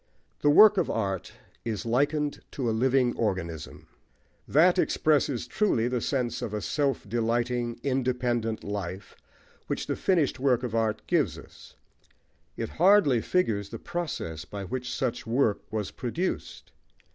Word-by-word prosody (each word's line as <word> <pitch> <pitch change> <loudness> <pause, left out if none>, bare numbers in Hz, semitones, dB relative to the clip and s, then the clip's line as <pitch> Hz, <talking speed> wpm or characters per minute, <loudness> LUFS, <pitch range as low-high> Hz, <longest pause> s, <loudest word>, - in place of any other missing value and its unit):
The 145 - +4
work 210 +7 +8
of 175 - 0
art 95 -4 -2 0.3
is 110 -3 -3
likened 145 +5 0
to 130 -4 -2
a - - +2
living 125 +1 +2
organism. 85 -7 -3 0.6
That 175 +5 +4
expresses 145 -8 +1
truly 155 - +1
the 125 -1 -1
sense 125 -3 -1
of 105 -2 -3
a 105 - -3
self 140 -2 -1
delighting, 120 +2 -1
independent 125 -4 -1
life 100 -1 -5 0.5
which - - -2
the - - -2
finished 170 -10 +1
work 130 -2 +2
of 120 -3 -3
art 110 -2 0
gives - - +1
us: - - -14 0.8
it - - -3
hardly 175 - +5
figures 110 - 0
the - - -6
process 115 - -4
by 100 -1 -7
which 125 +5 -4
such 125 -3 -2
work 115 -3 0
was 105 -2 -3
produced. 160 +10 -4
120 Hz, 140 wpm, -27 LUFS, 110-140 Hz, 0.8 s, work